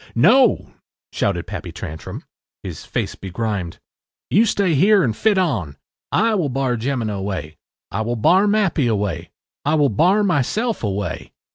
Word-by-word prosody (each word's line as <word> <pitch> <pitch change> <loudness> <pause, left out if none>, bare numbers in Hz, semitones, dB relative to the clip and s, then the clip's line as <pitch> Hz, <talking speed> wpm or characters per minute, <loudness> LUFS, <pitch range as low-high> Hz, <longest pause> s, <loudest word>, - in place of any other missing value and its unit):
” - - -34
“No,” 230 - +4 0.4
shouted 90 -4 -1
Pappy 90 -2 -6
Tantrum, 80 -2 -7 0.4
his - - -7
face - - -3
begrimed. 95 -2 -4 0.5
“You 225 +5 +4
stay 200 -4 +1
here 195 +6 +5
and 115 -5 0
fit 210 - +2
on. 105 - -1 0.3
I 225 +4 +2
will 175 -9 0
bar 130 -1 0
Jemina 120 -2 -2
away. 95 -6 -4 0.3
I - - -2
will 120 +2 -1
bar 180 - +4
Mappy 195 - +2
away. 100 -7 -2 0.3
I 150 +2 +2
will 145 -3 +3
bar 180 - +3
myself 200 - 0
away. 100 -5 -3
125 Hz, 150 wpm, -20 LUFS, -, 0.5 s, here